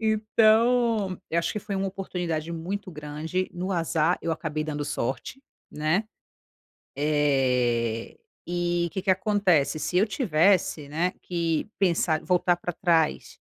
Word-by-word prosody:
Então, 220 -1 +3
eu 165 - +1
acho 170 - 0
que - - -3
foi 205 -2 -4
uma 195 0 -1
oportunidade 175 -4 -3
muito 185 +4 -4
grande. 155 +4 -4
No 180 +2 -3
azar, 165 -1 +1
eu 165 - -1
acabei 155 -1 -3
dando 150 -1 -3
sorte, 135 - -3 0.3
né. 155 +8 0 0.9
Eh, 125 -6 +1 0.3
e 175 0 0
o - - -6
que 190 +1 -4
que 195 - +1
acontece, 185 -6 +2
se 180 - -2
eu 205 - +4
tivesse, 185 - +2
né, 165 +5 0
que 170 0 -1
pensar 170 -4 +2
voltar 180 -1 +2
pra 175 0 -4
trás 165 -4 +1
175 Hz, 140 wpm, -26 LUFS, 155-195 Hz, 0.9 s, eu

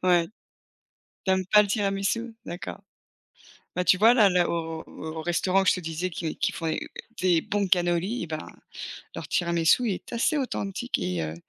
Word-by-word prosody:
Ouais, 175 -2 +4 1.0
tu 190 - +1
aimes 190 -1 0
pas 210 +2 +7
le 205 - -3
tiramisu? 205 +3 -1
D'accord. 175 +2 -6 1.0
Bah, 180 - +1
tu 185 - +5
vois, 220 +5 +6
là 220 -5 +6
le 180 -1 +3
au 165 -1 -3
au 160 0 -6
restaurant 180 +3 +2
où - - -3
je - - +5
te 185 - -4
disais 165 +2 -3
qui 165 -2 -4
qu'ils - - 0
font 165 - -4
des 160 - -2 0.3
des 180 -3 +4
bons 200 +1 -1
cannoli, 180 +5 +1
et - - -8
ben, 155 -1 -4 0.7
leur - - -6
tiramisu 170 +7 +2
est 190 - -5
assez 235 +6 +1
authentique 245 -3 -2
et 90 -1 -2
heu, 80 0 -4
180 Hz, 185 wpm, -26 LUFS, 165-200 Hz, 1.0 s, pas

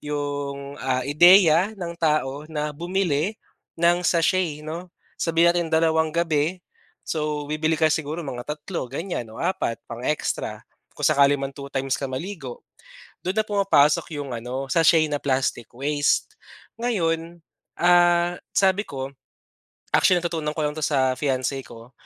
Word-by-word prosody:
'yong, 145 -1 -4
ah, 130 -1 -1
ideya 175 +4 +6
ng 175 -3 -5
tao 150 -2 0
na 150 -1 -3
bumili 175 +2 -1 0.4
ng 170 +1 +3
sachet 170 -3 +1
'no. 170 +4 -6 0.3
Sabihin 170 +1 +3
natin 175 -1 -1
dalawang 160 0 +3
gabi 165 +1 0 0.5
so 150 -2 -2
bibili 155 +1 0
ka 160 0 +3
siguro 155 +2 -2
mga 125 -5 -6
tatlo 150 +1 -4
3 125 - -19
ganyan 160 -5 -4
o - - -11
apat 170 -10 -1
4 - - -44
pang 115 - -7
extra 150 - -2 0.3
kung - - -10
sakali 140 0 +5
mang 135 -1 -3
two 140 0 -9
2 - - -32
times 135 0 -1
ka - - -3
maligo. 135 -1 -6 0.6
Do'n 185 +2 -2
na 215 - +2
pumapasok 195 -10 +3
'yong 140 -3 -5
ano 125 +4 -4
sachet 165 +2 +4
na 145 -1 -2
plastic 130 -4 -1
waste. 145 - 0 0.5
Ngayon, 170 -7 -1 0.4
ah, 175 0 +4 0.2
sabi 195 0 +3
ko 135 0 -6 0.8
actually 185 - +5
natutunan 160 -3 -2
ko - - -2
lang 150 - 0
'to 155 - -2
sa 130 -3 +2
fiance 135 -1 -1
ko. 115 +2 -13
155 Hz, 150 wpm, -24 LUFS, 140-170 Hz, 0.8 s, ideya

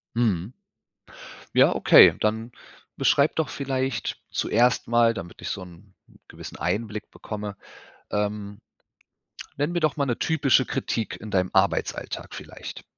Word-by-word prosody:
Mhm. 105 -4 0 1.0
Ja, - - +5
okay, - - +8
dann 110 +2 -1 0.4
beschreib 140 +2 +3
doch 160 - 0
vielleicht 130 -3 -3
zuerst 125 +2 +1
mal, 115 0 +4
damit 90 -4 -8
ich - - -5
so 100 - -4
'n 90 +2 -16 0.3
gewissen - - -10
Einblick 105 +4 -3
bekomme, 105 -1 -6 0.6
ähm 105 0 -3 1.0
nenn 145 +4 -1
mir 175 - 0
doch 155 -2 +1
mal 140 - +1
'ne 120 - -1
typische 140 -5 +2
Kritik 115 -1 -3
in 110 - -8
deinem 95 -1 +1
Arbeitsalltag 95 +1 -1
vielleicht. - - -9
110 Hz, 130 wpm, -25 LUFS, 100-130 Hz, 1.0 s, okay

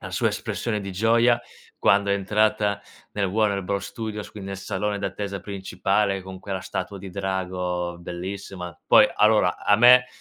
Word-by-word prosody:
la - - -8
sua - - +1
espressione 110 -3 -3
di 100 -1 -6
gioia 115 +4 +3 0.4
quando 100 +2 +3
è 100 - +3
entrata 105 +1 +1 0.3
nel 100 -1 0
Warner 100 0 +1
Bros 100 +2 -2
Studios, 110 -2 -6
quindi 100 -2 -8
nel 100 -1 -5
salone 100 +2 -2
d'attesa 100 -1 -4
principale 100 0 -1
con 95 0 -9
quella 95 -1 -5
statua 100 - -5
di 95 0 -9
drago 90 -2 -3
bellissima. 90 0 -7
Poi - - +7
allora 105 -4 +3
a 105 - +3
me 125 +2 +7
100 Hz, 160 wpm, -24 LUFS, 95-105 Hz, 0.4 s, Poi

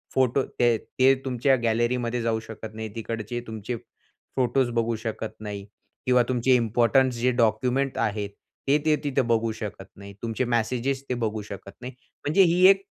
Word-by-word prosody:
Photo 130 +1 +3 0.2
ते 120 -2 +4 0.2
ते 135 +1 +7
तुमच्या 130 +1 +2
गॅलरीमध्ये 120 +1 +1
जाऊ 115 -1 0
शकत 110 0 -8
नाही, 110 0 -5
तिकडचे 115 +1 -4
तुमचे 110 +2 -4 0.6
फोटोस 130 0 +2
बघू 115 0 +1
शकत 110 0 -4
नाही 100 -2 -6 0.4
किंवा 125 -1 +5
तुमचे 125 +1 +3
इम्पोर्टन्स 120 +2 +3
जे 125 +1 +3
डॉक्युमेंट 125 +4 +1
आहेत, 105 -1 -1 0.4
ते 140 - +5
ते 155 -1 +4
तिथे 140 -2 +1
बघू 115 0 +2
शकत 105 -3 -7
नाही. 100 0 -11
तुमचे 115 +2 -1
मेसेजेस 125 +3 0
ते - - +1
बघू 110 0 -1
शकत 100 0 -8
नाही. 125 +1 -7 0.3
म्हणजे 155 +7 +4
ही 180 +1 +4
एक 195 0 +4
120 Hz, 160 wpm, -26 LUFS, 110-130 Hz, 0.6 s, ते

